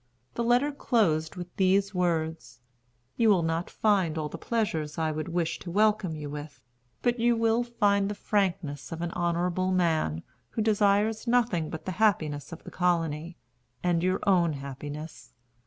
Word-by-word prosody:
The 235 - -2
letter 245 +5 +3
closed 185 - +1
with 180 -1 -8
these 195 +1 +3
words: 165 -8 -1 0.6
"You 230 -2 +4
will 185 -5 +4
not 165 +2 -1
find 190 -7 +1
all 150 -1 -2
the - - -7
pleasures 165 -10 -2
I 160 -1 0
would 155 +1 -4
wish 170 -1 -1
to 175 - -8
welcome 205 -2 +2
you 150 -1 -6
with, 145 -2 -7 0.4
but 240 0 +1
you 235 0 +3
will 225 +1 +2
find 205 -4 +1
the 205 - -3
frankness 175 -10 -1
of 165 0 -5
an 170 - -2
honorable 175 +2 0
man, 160 - +1 0.3
who 220 - -2
desires 210 +1 +2
nothing 230 -10 +2
but 160 - -7
the 185 - -2
happiness 155 -10 +1
of 165 - -9
the - - -10
colony, 170 -2 -1 0.5
and 175 -2 +2
your 185 +2 +1
own 175 -5 +3
happiness. 145 +3 -8
180 Hz, 165 wpm, -28 LUFS, 160-210 Hz, 0.6 s, You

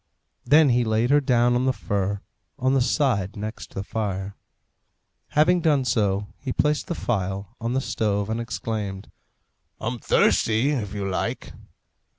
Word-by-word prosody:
Then 145 +3 +6
he 120 0 +3
laid 110 +3 +1
her 145 0 +5
down 120 -2 +3
on 125 +1 +1
the - - +4
fur, 100 -3 -2 0.4
on 130 +1 +1
the 135 - +3
side 120 - +1
next 110 +1 -7
the 95 - -3
fire. 100 -2 -3 0.9
Having 170 +4 +3
done 145 -5 +2
so, 100 -4 +1
he 135 - -4
placed 150 +3 +1
the 170 - -2
phial 95 -6 -2
on 115 +1 -1
the 135 - +1
stove, 105 -5 -1
and 110 +1 -2
exclaimed, 105 -3 -4 0.7
"I'm 120 +2 -3
thirsty, 115 +6 +3
if 105 -8 -3
you 100 -1 -2
like!" 95 - -3
115 Hz, 155 wpm, -24 LUFS, 100-130 Hz, 0.9 s, Then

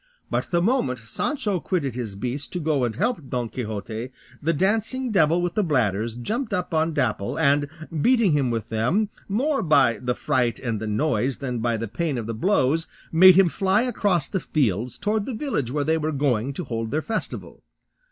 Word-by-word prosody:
But - - -1
the 170 -1 +1
moment 215 - +1
Sancho 195 - -2
quitted 145 -6 -1
his 115 -5 -5
beast 125 +7 -4
to 180 - -2
go 150 -5 +1
and 115 - -3
help 205 - -1
Don 120 -2 -2
Quixote, 110 0 -5 0.3
the 160 - +1
dancing 220 - 0
devil 170 -2 +3
with 175 -1 -1
the 210 - +1
bladders 115 - 0
jumped 215 - -2
up 180 -2 -3
on 160 +1 +2
Dapple, 105 -4 -1
and 145 +1 +3 0.3
beating 235 - +4
him 140 -4 +2
with 115 -2 -3
them, 140 - +1 0.2
more 270 +8 +1
by 140 -8 +3
the 125 -1 -1
fright 120 -2 0
and 115 -4 -3
the 110 - -4
noise 120 +3 0
than 125 -4 -3
by 115 0 0
the 115 +1 -4
pain 150 +5 -2
of 115 - -3
the 115 - -3
blows, 160 - +1 0.2
made 185 +2 +8
him 190 -1 +6
fly 195 +5 +2
across 200 - +1
the 190 - -2
fields 120 - -1
towards 210 0 -1
the 260 - -3
village 215 - -2
where 145 +3 -1
they 160 +2 +1
were 155 0 -1
going 135 -4 0
to 180 - -4
hold 115 -5 -3
their 155 +5 -1
festival. 225 -1 -5
145 Hz, 195 wpm, -24 LUFS, 120-190 Hz, 0.3 s, made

